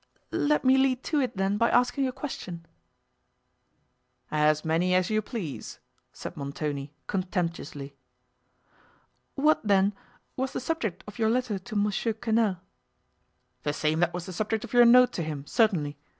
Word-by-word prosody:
"Let 295 -2 +1
me 260 +1 +6
lead 265 -1 +2
to 305 - 0
it 250 -6 -2
then, 195 +1 +1
by 230 - +4
asking 250 +2 +2
a - - -2
question." 180 - -7 1.7
"As 155 0 +2
many 170 +3 +2
as 185 +2 +2
you 215 0 +2
please," 205 - -6 0.3
said - - -8
Montoni, 140 0 -4
contemptuously. 170 -7 -3 1.4
"What, 300 +2 +3
then, 200 -1 +3 0.4
was 265 +1 -2
the - - -2
subject 250 - -3
of 210 +3 -11
your 220 -1 +3
letter 235 -4 0
to 215 +4 -9
Mons. 205 -1 +1 0.2
Quesnel?" 220 -4 +1 1.0
"The 145 - -1
same 155 +1 0
that 175 0 +2
was 175 -1 -5
the 185 - -7
subject 215 +3 -1
of - - -9
your 240 0 +7
note 250 +1 +7
to - - -2
him, 150 -3 -5
certainly. 155 - +1
200 Hz, 150 wpm, -27 LUFS, 165-245 Hz, 1.7 s, your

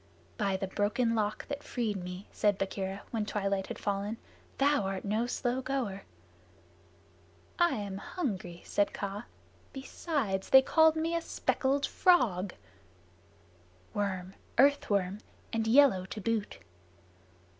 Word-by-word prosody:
"By 195 -3 0
the 195 - -2
Broken 210 +5 0
Lock 215 -1 -1
that 285 0 -4
freed 230 -7 -2
me," 180 +2 -7
said 205 -2 +2
Bagheera, 195 0 -3
when 225 -2 -1
twilight 200 -2 -1
had - - -5
fallen, 205 +2 -2 0.4
"thou 285 -1 +3
art 195 0 -3
no 215 +4 0
slow 245 +1 -1
goer!" 245 -8 -3 1.5
"I 345 -1 +4
am 200 -2 -4
hungry," 190 - -4
said 205 -1 +1
Kaa. 200 +3 -4 0.5
"Besides, 265 - -2
they 265 0 +8
called 320 +2 +5
me 330 +1 0
speckled 280 -3 0
frog." 210 - +3 1.4
"Worm 190 -2 -2 0.2
earth 280 +2 +4
worm, 200 -1 0 0.3
and 225 -1 0
yellow 240 -6 +5
to 215 - -6
boot." 215 0 -1
210 Hz, 125 wpm, -31 LUFS, 195-265 Hz, 1.5 s, they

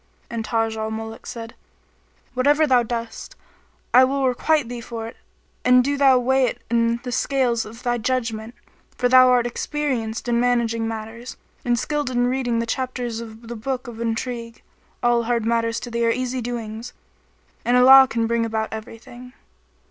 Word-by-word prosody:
And 230 -1 -3
Taj 225 0 -1
al 220 0 -2
Muluk 225 0 -7
said, 230 -1 -7 0.8
"Whatever 290 +5 +3
thou 255 -4 +4
dost, 230 -1 -5 0.6
I 255 - +8
will 270 +1 +1
requite 285 +2 +1
thee 240 0 -6
for 230 -1 -6
it 230 - -10 0.5
and 250 0 +5
do 285 +2 0
thou 270 -2 +5
weigh 260 +1 +2
it 240 - -3
in 230 0 +2
the 250 - -5
scales 245 -2 0
of 230 +3 -12
thy 240 -1 0
judgement, 230 -1 -2 0.4
for 250 - +2
thou 255 0 +7
art 245 -1 +3
experienced 240 -3 -3
in 235 -1 +2
managing 235 -2 +1
matters, 225 +2 -7 0.3
and 240 -1 +1
skilled 295 +2 -2
in 245 -1 +1
reading 245 -2 0
the 230 - 0
chapters 245 -1 -3
of 225 0 -11
the 235 - -6
book 255 +3 -4
of 230 -1 -8
intrigue: 230 0 -4 0.4
all 240 -1 +2
hard 235 -1 0
matters 230 0 0
to 240 - -7
thee 235 0 0
are - - +3
easy 255 +1 -2
doings; 230 -1 -6 0.7
and 245 +1 +3
Allah 265 +1 +9
can 230 0 0
bring 235 0 0
about 220 -1 -2
everything." 240 +3 -10
240 Hz, 170 wpm, -22 LUFS, 230-255 Hz, 0.8 s, Allah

